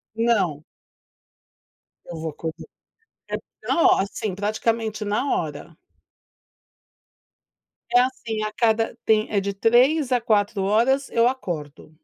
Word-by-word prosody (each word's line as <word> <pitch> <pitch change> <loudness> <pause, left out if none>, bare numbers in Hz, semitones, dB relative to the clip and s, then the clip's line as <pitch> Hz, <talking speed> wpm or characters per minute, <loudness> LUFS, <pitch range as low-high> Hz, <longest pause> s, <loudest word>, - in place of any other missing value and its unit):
Não. 200 -10 +1 1.4
Eu 175 - -8
vou 160 0 -4
acordar. 160 +2 -7 0.6
Então 335 - -1
ó, - - +5
assim, 195 0 -3
praticamente 215 +1 -1
na 205 +6 0
hora. 155 0 -5 2.2
É - - +8
assim, 230 -4 -2
a 215 - -2
cada 225 -1 +1
tem 215 -1 +2
é 205 - +2
de 200 0 -2
3 250 +8 +3
a 245 -2 +2
4 210 -2 +1
horas, 235 +8 +2
eu 235 +1 +3
acordo. 155 - -5
215 Hz, 115 wpm, -23 LUFS, 190-235 Hz, 2.2 s, É